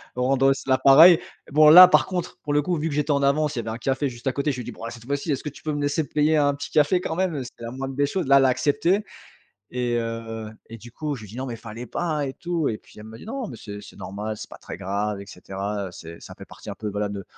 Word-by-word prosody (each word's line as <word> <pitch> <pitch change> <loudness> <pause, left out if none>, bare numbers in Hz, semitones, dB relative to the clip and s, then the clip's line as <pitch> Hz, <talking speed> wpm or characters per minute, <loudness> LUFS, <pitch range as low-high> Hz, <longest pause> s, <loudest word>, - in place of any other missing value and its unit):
rendre 130 +1 +2
aussi 135 0 +1
la 130 - +4
pareille». 160 +6 +8 0.3
Bon, 150 +1 +7
là, 180 +3 +11
par - - +4
contre, 180 -2 -4
pour 145 - -2
le 150 - +3
coup, 175 +3 -1
vu 155 +2 -2
que 145 - -4
j'étais 150 0 0
en 140 -1 +2
avance, 150 +1 +1
il 120 - -2
y - - 0
avait 115 - -6
un 110 - -4
café 135 +3 -1
juste 120 0 -8
à 130 - +3
côté. 140 +1 0
Je 130 - -5
lui 125 - -5
dis: - - -7
«Bon, - - -12
bah, 115 - -5
cette 115 -1 -12
fois-ci, 140 +4 -2
est-ce 135 - -2
que 150 - -3
tu 145 - -15
peux 155 -1 -2
me 145 - -3
laisser 145 +1 0
te - - -32
payer 150 +1 +3
un 145 -1 +3
petit 140 - -7
café 155 +4 +3
quand 160 - -3
même?» 185 -3 0
heu, 135 - -3
c'était 120 -1 -12
la 115 - -5
moindre 135 +1 -5
des 145 - +2
choses. 180 +5 -2
Là, 140 0 +7
elle 135 - +5
l'a 130 - +4
accepté 170 +10 +1 0.7
et 120 -1 -1
heu 115 -1 -5 0.2
et 115 - -9
du 120 +2 -13
coup, 150 +4 -4
je 115 - -10
lui 105 - -11
dis: 115 - -10
«Non, 130 - -3
mais 120 - -5
fallait 115 +2 -8
pas 155 +3 -2
et 135 - -5
tout» 170 -2 -2
et 110 - -4
puis, - - -21
elle 105 - -10
me 110 +1 -11
dit: - - -12
«Non, 260 0 -4
mais 120 - -9
c'est 105 -1 -8
c'est 105 - -14
normal, 105 +4 -5
c'est - - -9
pas - - -11
très - - -9
grave 100 +2 -3
et - - -10
cetera, 100 +1 -5
heu, - - -8
c'est 85 -1 -11
ça - - -10
fait - - -11
partie - - -12
un - - -7
peu, 105 - -5
voilà, 105 0 -2
de 100 -1 -6
135 Hz, 320 wpm, -24 LUFS, 115-150 Hz, 0.7 s, là